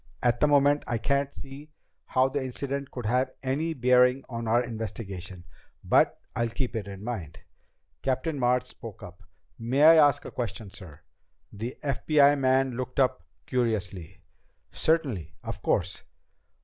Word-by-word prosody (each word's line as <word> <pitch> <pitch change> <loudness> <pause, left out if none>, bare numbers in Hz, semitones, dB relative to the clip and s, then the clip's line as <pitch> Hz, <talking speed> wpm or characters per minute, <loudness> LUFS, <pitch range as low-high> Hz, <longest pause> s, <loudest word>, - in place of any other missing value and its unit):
"At 120 -1 +2
the 150 - +4
moment 145 0 +4
I 120 - 0
can't 140 +4 0
see 140 +3 -11 0.4
how 130 0 +3
the 135 +1 -2
incident 140 +2 -4
could 125 -3 -7
have 125 +4 +1
any 155 +5 -1
bearing 125 +1 +4
on 115 -2 -5
our 120 +2 +3
investigation, 100 -5 -6 0.4
but - - +3 0.2
I'll 120 -1 0
keep 125 +1 -3
it 105 -3 -3
in 100 0 -8
mind." 95 -10 -5 0.6
Captain 140 +3 -1
March 125 0 +2
spoke 115 -4 -11
up. 90 0 -11 0.4
"May 125 +5 +1
I 165 +1 +9
ask 145 -3 +4
a - - -7
question, 110 -3 -5
sir?" 90 -7 -12 0.5
The 115 +5 -6
FBI 145 +1 +4
man 130 0 +2
looked 125 +2 -4
up 130 -1 +2 0.2
curiously. 100 -8 -2 0.5
"Certainly. 120 - 0
Of - - -6
course!" - - 0
125 Hz, 150 wpm, -27 LUFS, 110-135 Hz, 0.6 s, I